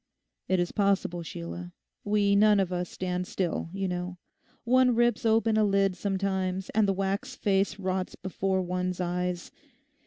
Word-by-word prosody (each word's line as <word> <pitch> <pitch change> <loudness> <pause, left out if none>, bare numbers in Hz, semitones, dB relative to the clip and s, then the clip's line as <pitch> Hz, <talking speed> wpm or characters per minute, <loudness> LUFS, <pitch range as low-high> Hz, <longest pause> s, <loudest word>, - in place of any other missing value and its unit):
'It 185 -1 +2
is 175 - 0
possible, 195 -4 +1
Sheila; 85 - -7 0.3
we 205 -1 +2
none 210 0 +5
of 185 -2 0
us 180 0 -2
stand 180 -1 -3
still, 175 -3 -2
you 195 0 -2
know. 180 0 -4 0.5
One 250 0 +4
rips 240 -1 +2
open 225 0 +3
a 215 - +4
lid 195 -2 +2
sometimes 190 -1 -2
and 215 -1 +3
the 195 - +2
wax 195 +6 -2
face 195 -3 +1
rots 185 -1 -2
before 190 0 -1
one's 180 0 -2
eyes. 180 0 -2
190 Hz, 155 wpm, -28 LUFS, 180-205 Hz, 0.5 s, none